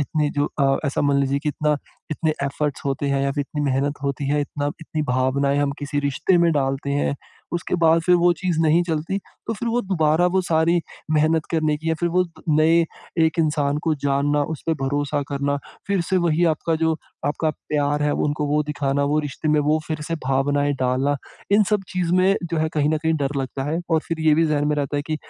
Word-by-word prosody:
इतनी 150 +1 0
जो 145 0 0
अ, 135 0 +3
ऐसा 140 - -1
मान 140 -1 +3
लीजिए 140 0 +1
कि 150 +1 -3
इतना 150 +1 0 0.3
इतने 155 +1 0
एफर्ट्स 140 +1 -2
होते 140 +1 -1
हैं 140 0 +1
या 140 - +1
फिर 145 - -2
इतनी 145 +1 -3
मेहनत 140 +2 0
होती 140 0 -2
है, 145 0 +2
इतना 145 0 -3
इतनी 155 -1 -3
भावनाएँ 140 +1 +1
हम 145 -1 +1
किसी 145 0 -3
रिश्ते 145 +6 +1
में 170 0 +4
डालते 135 0 -1
हैं। 140 0 0 0.4
उसके 175 +1 -2
बाद 165 0 +5
फिर 180 +1 +4
वो 175 0 +4
चीज़ 175 -2 -2
नहीं 160 +2 +4
चलती, 165 +4 -2 0.3
तो 225 - -1
फिर 230 +3 -3
वो 240 +2 +1
दुबारा 170 -3 +2
वो 185 +1 +2
सारी 170 0 +2 0.3
मेहनत 155 +1 +2
करने 155 -2 +1
की 160 +2 -5
या - - +2
फिर 175 - +1
वो 180 +2 +2 0.2
नए 160 +2 +4 0.4
एक 160 +2 0
इंसान 150 -2 +1
को 160 - +2
जानना, 145 +1 +1
उसपे 160 +2 -2
भरोसा 145 +1 0
करना, 140 0 -1 0.3
फिर 200 -2 +1
से 190 - +2
वही 170 -1 +2
आपका 165 +1 -1
जो 160 0 +1 0.3
आपका 155 +2 0
प्यार 145 -1 -1
है 150 0 +2
उनको 150 0 -1
वो 150 +1 +2
दिखाना, 140 -1 -1
वो 150 +2 +1
रिश्ते 150 +1 -4
में 150 0 +3
वो 150 +2 +2
फिर 155 -1 -3
से 165 - 0
भावनाएँ 145 +2 +1
डालना, 130 +3 +1 0.4
इन 210 +1 +6
सब 210 -2 +2
चीज़ 180 -2 -1
में 190 +2 +4 0.2
जो 165 - +1
है 160 0 +1
कहीं 150 -1 +2
न 155 - +1
कहीं 160 0 +2
डर 145 -1 -1
लगता 135 0 -3
है 165 +3 -1
और 160 - +3
फिर 165 -1 -2
ये 155 -1 +4
भी 165 - +3
ज़हन 150 -1 +1
में 150 - +1
रहता 145 0 -1
है 145 - 0
कि 155 -1 -1
150 Hz, 225 wpm, -22 LUFS, 145-160 Hz, 0.4 s, इन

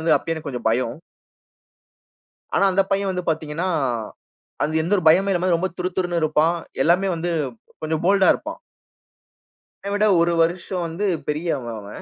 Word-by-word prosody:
வந்து 160 +1 +3
அப்பயே 165 - -2
எனக்கு 160 -2 -7
கொஞ்சம் 125 -4 -5
பயம். 115 +1 0 1.6
ஆனா 200 - +4
அந்த 190 +1 +3
பையன் 195 0 +1
வந்து 180 -1 -3
பார்த்தீங்கனா, 160 +2 -2 1.0
அது 160 +1 +1
எந்த 175 +5 0
ஒரு 180 - -2
பயமும் 190 +5 +4
இல்லாம 180 0 +1
ரொம்ப 185 +3 -1
துரு 180 0 -1
துருன்னு 175 -2 0
இருப்பான். 155 +2 +2 0.3
எல்லாமே 180 +4 +3
வந்து 170 +1 -3 0.5
கொஞ்சம் 155 +1 -2
போல்ட்டா 195 0 +4
இருப்பான். 320 +8 -7 1.2
என்னய 200 - -2
விட 210 +1 +3
ஒரு 170 0 +2
வருஷம் 175 +2 -1
வந்து 165 +6 -3 0.2
பெரியவன் 150 -7 -2
அவன். 100 0 -9
170 Hz, 155 wpm, -22 LUFS, 155-185 Hz, 1.6 s, ஆனா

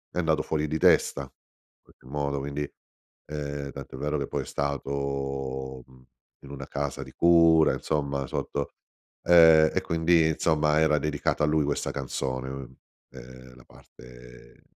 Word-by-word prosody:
è - - 0
andato 80 -2 +1
fuori 75 -1 -1
di 80 +2 -2
testa 70 - +3
in 65 - -21
qualche - - -25
modo, 70 +1 -2
quindi, 70 +1 -4 0.6
ehm, 70 -2 -5
tanto 70 -1 -9
è - - -8
vero 75 +1 -1
che 70 - -3
poi - - -3
è - - -13
stato, 70 -1 -3
mhmm, 65 -1 -20 0.4
in 70 - -12
una 70 -1 -8
casa 70 0 -4
di - - -13
cura 85 -2 +5
insomma, 70 -3 -2
sotto 70 -1 -4 0.5
ehm, 80 -2 +7
e - - 0
quindi 80 0 +2
insomma 75 -1 +2
era 75 -1 +3
dedicata 75 0 -1
a - - -1
lui 75 0 +2
questa 70 0 -2
canzone, 65 -1 -4 0.6
ehm 65 0 -13
la 65 - -17
parte - - -16
70 Hz, 155 wpm, -26 LUFS, 65-75 Hz, 0.6 s, ehm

